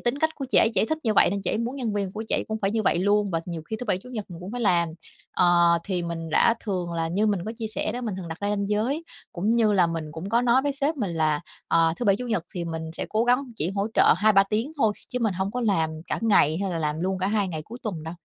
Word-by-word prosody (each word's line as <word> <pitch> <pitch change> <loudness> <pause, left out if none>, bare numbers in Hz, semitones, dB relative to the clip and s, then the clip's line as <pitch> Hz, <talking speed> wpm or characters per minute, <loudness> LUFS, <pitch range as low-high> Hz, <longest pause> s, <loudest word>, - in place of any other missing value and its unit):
tính 240 +3 -1
cách 315 +2 +2
của 275 - -5
chị - - +5
ấy 225 - +5
chỉ - - +4
thích 315 +4 -1
như 220 -2 +2
vậy - - +5
nên 200 +1 -2
chị 185 - 0
ấy - - -1
muốn 235 +4 -3
nhân 235 -6 -2
viên 200 -2 -2
của 220 +2 -5
chị - - +2
ấy - - 0
cũng 220 0 -2
phải 195 - +2
như 220 +1 0
vậy 170 - +2
luôn 205 +2 +2
và 165 -2 0
nhiều 170 -3 -5
khi 220 - -5
thứ - - -3
Bảy, 195 -3 +1
Chủ 225 - -14
nhật 225 -5 -5
mình 170 -1 -9
cũng 185 +4 -7
phải 245 - -4
làm. 175 -6 +3 0.4
Ờ, 175 -1 +4
thì 185 -3 -2
mình 165 -1 -5
đã 225 +8 +4
thường 180 -5 -3
là- 165 -1 -1
như 200 +6 +1
mình 205 -3 +1
có 220 - -4
chia 225 - -3
sẻ 210 - -1
đó- 245 - -4
mình 220 -5 -3
thường 180 -3 -7
đặt 160 - -7
ra 205 - -1
ranh 200 -1 -1
giới, 240 +10 0 0.3
cũng 190 +4 -2
như 220 -3 +3
là 185 -4 +4
mình 165 -1 -3
cũng 165 +5 -6
có 235 +2 +3
nói 250 +2 +4
với 285 0 0
sếp 285 +3 -1
mình 210 -9 -2
là, 155 -2 +1 0.3
ờ, 165 -1 +3
thứ 245 - -4
Bảy, 200 -3 +4
Chủ 250 - -5
nhật 215 -8 0
thì 175 -2 -3
mình 165 -1 -4
sẽ - - -4
cố 220 +2 +1
gắng 250 +3 +3
chỉ 165 -1 -1
hỗ 200 +1 -1
trợ - - +6
2-3 205 +1 +5
tiếng 220 +9 -2
thôi, 220 -7 +2 0.2
chứ 250 - -3
mình 215 -4 +1
hông 190 +2 -2
có 250 - -3
làm 190 -9 +1 0.2
cả - - -2
ngày 180 -8 +4
hay 195 - -1
là 170 - -2
làm 150 0 -2
luôn 190 +2 -1
cả 185 - 0
hai 205 -1 +1
ngày 160 -3 -4
cuối 230 +9 -10
tuần 185 -9 -4
đâu. 160 +2 -6
200 Hz, 315 wpm, -25 LUFS, 170-225 Hz, 0.4 s, trợ